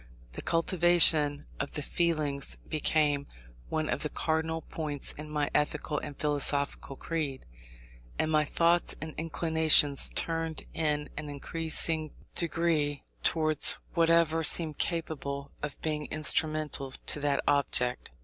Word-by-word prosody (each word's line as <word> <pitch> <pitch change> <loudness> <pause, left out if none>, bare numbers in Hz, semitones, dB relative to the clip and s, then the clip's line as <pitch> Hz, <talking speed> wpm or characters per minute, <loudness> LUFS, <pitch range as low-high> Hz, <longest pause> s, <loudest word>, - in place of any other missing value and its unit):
The - - -8
cultivation 165 -4 +3
of 145 - -4
the 150 - -2
feelings 155 -4 0
became 150 -2 0 0.4
one 155 -1 -2
of - - -2
the 150 - -2
cardinal 160 +1 -2
points 150 -3 -5
in 150 +1 -10
my 150 -1 -2
ethical 150 0 -1
and 145 - -8
philosophical 145 -1 0
creed. 150 -4 -4 0.7
And 160 - -1
my 155 -1 +3
thoughts 170 +3 +1
and 155 0 -6
inclinations 160 -3 +3
turned 165 -1 -2
in 150 -2 -1
an 150 0 -6
increasing 160 +1 +1 0.2
degree 165 -4 0 0.2
towards 155 -2 +4 0.2
whatever 165 -1 +2
seemed 155 -1 +3
capable 140 -4 -3
of 150 -2 -6
being 150 -2 -2
instrumental 155 -2 +1 0.2
to - - 0
that 145 -1 0
object. 125 -3 0
155 Hz, 120 wpm, -29 LUFS, 145-160 Hz, 0.7 s, towards